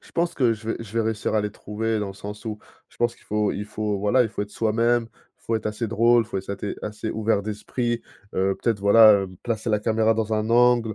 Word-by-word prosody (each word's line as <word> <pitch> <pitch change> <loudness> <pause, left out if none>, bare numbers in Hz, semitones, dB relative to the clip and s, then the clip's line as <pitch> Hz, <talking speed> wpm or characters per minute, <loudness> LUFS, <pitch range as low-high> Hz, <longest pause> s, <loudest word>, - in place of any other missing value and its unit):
je - - -19
pense 170 0 0
que 125 -4 +3
je 110 0 -7
vais - - -1
je 115 -3 -9
vais - - +3
réussir 110 -1 -1
à 110 - +3
les 105 0 -2
trouver 110 +2 -3
dans 105 - -2
le 95 - -7
sens 105 +2 -8
où 110 -2 -5 0.3
je - - -24
pense 120 0 0
qu'il - - -23
faut 105 -1 0
il 105 - -4
faut 105 -1 -3
voilà, 105 +6 +3
il 115 - -1
faut 105 - -4
être 105 - -8
soi-même, 115 +1 +1 0.3
il - - -34
faut 115 - 0
être 110 - -4
assez 105 +2 -3
drôle, 115 +2 +4
il 110 - -13
faut 100 - -2
être 95 - -7
assez 100 +1 -5
assez 105 +1 -5
ouvert 110 -2 0
d'esprit, 115 +3 -3 0.3
heu, 95 +1 +2
peut-être 115 -3 +1
voilà, 100 0 +7
hem, 95 -1 -11
placer 115 -1 -2
la 105 -2 +1
caméra 110 0 +2
dans 110 0 -2
un 110 0 0
angle, 120 -2 +4
110 Hz, 265 wpm, -24 LUFS, 105-115 Hz, 0.3 s, voilà